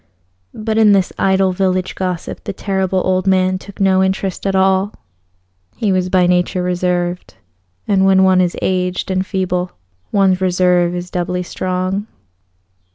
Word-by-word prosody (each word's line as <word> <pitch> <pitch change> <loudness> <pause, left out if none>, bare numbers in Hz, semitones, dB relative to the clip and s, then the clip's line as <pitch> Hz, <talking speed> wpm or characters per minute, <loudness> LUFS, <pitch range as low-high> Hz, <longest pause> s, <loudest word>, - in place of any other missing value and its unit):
But 220 0 -1
in 210 -2 +6
this 190 -2 +1
idle 190 0 +2
village 185 0 -1
gossip 180 -3 -4
the - - -4
Terrible 190 -1 -1
Old 185 0 0
Man 185 0 +2
took 200 +2 -13
no 190 -1 +3
interest 190 0 -2
at 195 - 0
all. 190 +2 +2 0.8
He 210 -3 0
was 185 -1 0
by 180 -1 +3
nature 180 0 +1
reserved, 180 - -2 0.5
and 195 -2 +2
when 190 0 +4
one 185 -1 +4
is 175 -1 -1
aged 185 0 -1
and 185 0 0
feeble 180 -2 -2 0.4
one's 190 -2 +2
reserve 180 -1 +2
is 180 0 -6
doubly 180 0 -2
strong. 185 +3 -3
185 Hz, 150 wpm, -17 LUFS, 180-190 Hz, 0.8 s, in